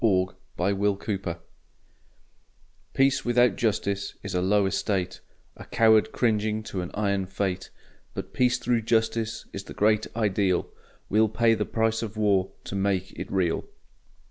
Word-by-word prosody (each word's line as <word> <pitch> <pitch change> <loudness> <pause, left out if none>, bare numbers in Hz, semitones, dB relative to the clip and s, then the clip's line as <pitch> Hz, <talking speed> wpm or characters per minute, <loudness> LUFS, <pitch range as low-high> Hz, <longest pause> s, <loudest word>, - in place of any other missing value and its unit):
THE 95 -5 +3 0.3
PRICE 95 +3 +1
OF 100 -1 +2 0.2
PEACE 85 -4 -3 1.6
Peace 135 0 +3
without 120 -2 +3
Justice 100 -3 -1
is 100 -1 -5
a 90 - +1
low 100 +2 +3
estate, 95 -1 -1 0.4
A - - -10
coward 110 -1 +4
cringing 110 -2 0
to 95 -4 -4
an 90 - -5
iron 100 -2 0
Fate! 95 -1 -2 0.5
But - - -6
Peace 125 0 +3
through 120 -2 +1
Justice 115 0 0
is 100 0 -6
the - - -10
great 110 +1 +2
ideal, 100 -5 +1 0.4
We'll 110 +2 +3
pay 115 +1 +3
the 105 -2 0
price 115 0 0
of 110 -1 -5
war 100 -3 +2
to - - -7
make 95 -1 0
it - - -7
real. 90 -4 0
105 Hz, 150 wpm, -26 LUFS, 95-110 Hz, 1.6 s, coward